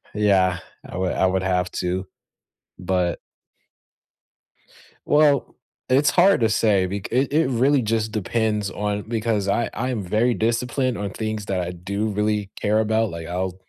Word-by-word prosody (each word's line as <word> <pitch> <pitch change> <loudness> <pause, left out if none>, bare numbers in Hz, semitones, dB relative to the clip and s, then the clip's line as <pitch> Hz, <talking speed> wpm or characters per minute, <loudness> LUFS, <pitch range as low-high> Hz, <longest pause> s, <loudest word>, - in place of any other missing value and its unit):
yeah, 95 -4 +3 0.3
I - - -7
would 90 -1 0
I - - +2
would 95 0 0
have 90 -1 0
to. 90 +1 -2 0.7
But 90 -1 -1 1.9
Well, 145 -2 +3 0.3
it's 135 +3 +4
hard 185 -1 +4
to 115 - +3
say. 105 -3 +2
Bec 100 +2 -5
it 130 +3 +1
it 155 -2 +3
really 135 +3 +3
just 110 -1 -1
depends 105 -1 -1
on 105 +1 -2
because 110 -2 -1
I 120 +4 0
I'm 125 -3 -2
very 110 +6 +1
disciplined 120 +3 0
on 100 -1 -3
things 110 +1 -4
that 95 -2 -1
I 90 0 -3
do 100 +5 -3
really 105 -1 -1
care 105 +1 +2
about. 110 0 +1
Like, 85 -1 -7
I'll 90 +1 -2
105 Hz, 155 wpm, -22 LUFS, 95-115 Hz, 1.9 s, it's